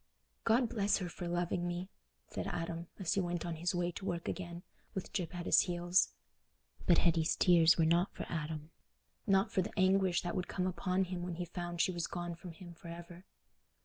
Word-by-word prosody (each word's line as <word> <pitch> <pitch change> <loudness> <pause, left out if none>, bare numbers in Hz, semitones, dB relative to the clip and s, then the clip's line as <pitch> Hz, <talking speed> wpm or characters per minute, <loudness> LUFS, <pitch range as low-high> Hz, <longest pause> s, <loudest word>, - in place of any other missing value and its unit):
"God 235 +2 +4
bless 210 -3 +2
her 185 - -3
for 175 +1 -6
loving 175 0 0
me," 175 +1 -3 0.4
said - - -4
Adam, 165 0 -3
as 185 -5 0
he 195 - +2
went 175 -1 -2
on 170 -2 -3
his 175 +3 0
way 175 0 0
to 190 - -8
work 170 -3 -2
again, 175 -1 -4 0.3
with 190 - -4
Gyp 180 -2 -2
at 175 -1 -4
his - - +6
heels. 175 0 +3 0.8
But 175 - +6
Hetty's 165 -1 +3
tears 170 -2 +6
were 165 - +4
not 170 +3 +3
for - - -4
Adam—not 165 +5 -2
for 190 - +2
the 195 - -6
anguish 185 -1 +3
that 175 - -2
would 185 -1 -1
come 185 - -1
upon 185 +1 +1
him 180 -1 -4
when 175 -1 -3
he 175 +1 -3
found 175 0 -3
she - - +3
was 170 -1 -2
gone 175 0 -4
from 170 0 -9
him 175 +1 -11
for 170 - -13
ever. 170 +2 -9
175 Hz, 205 wpm, -34 LUFS, 170-185 Hz, 0.8 s, his